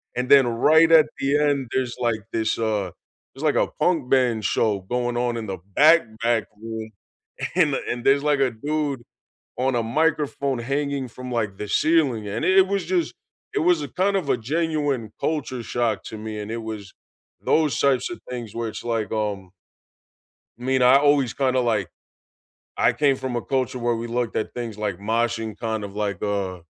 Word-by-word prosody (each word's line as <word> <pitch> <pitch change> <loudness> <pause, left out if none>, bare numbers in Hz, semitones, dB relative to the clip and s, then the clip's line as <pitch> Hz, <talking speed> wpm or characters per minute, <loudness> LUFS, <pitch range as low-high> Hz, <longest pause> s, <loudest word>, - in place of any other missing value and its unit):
and 125 +1 -2
then 135 -3 +7
right 160 +8 +4
at 160 -2 +7
the 140 +2 +2
end, 145 -4 +1
there's, 130 -2 -1
like, 115 -3 0
this, 110 -1 0
uh 105 -5 -1 0.4
there's, 135 +4 -9
like, 145 - +2
a - - -2
punk 160 -7 +1
band 120 -5 +2
show 110 +1 +2
going 120 +4 -2
on 120 -1 0
in 115 - -4
the 95 -1 -4 0.2
back, 160 +3 +8 0.2
back 115 -2 +2 0.2
room, 110 -1 -6 0.7
and 155 -6 +3 0.2
and 120 0 -3
there's, 140 +1 +4
like, 140 -2 +2
a 135 - +3
dude 145 +3 -2 0.6
on 130 +1 +1
a 115 - +1
microphone 140 +1 0
hanging 140 -2 -1
from, 125 0 -8
like, 110 -4 -1
the 105 - -5
ceiling, 150 -9 +2
and 110 - -2
it 190 - +3
it 190 - -3
was 200 -1 0
just 175 -3 0 0.4
it - - +1
was 175 -3 +4
a 145 - -5
kind 195 +1 +3
of 145 - -10
a - - +3 0.2
genuine 150 -7 0 0.2
culture 135 -6 -2
shock 120 -2 +1
to 110 - -7
me, 110 - -4
and 105 - -7
it 115 0 -4
was 105 -2 -6 0.7
those 155 -3 +2
types 130 -2 +2
of 175 - -7
things 120 -4 -6
where 115 -1 -2
it's - - -8
like, 110 -2 -2
um 100 -2 -3 1.2
I 125 - -10
mean, 130 0 +1
I 125 +2 +7
always 140 -4 +3
kinda, 130 -2 +1
like 110 -7 0 0.9
I - - +3
came 140 -2 +2
from 130 -2 -4
a 120 - -1
culture 130 -2 -2
where 120 0 0
we 115 +1 -4
looked 120 -1 -2
at - - -2
things 115 -3 -5
like 105 -4 -2
moshing 115 0 -1
kind 110 -2 -3
of 100 -1 -8
like, 100 -3 -2
uh 100 -3 -2
125 Hz, 195 wpm, -23 LUFS, 110-140 Hz, 1.2 s, back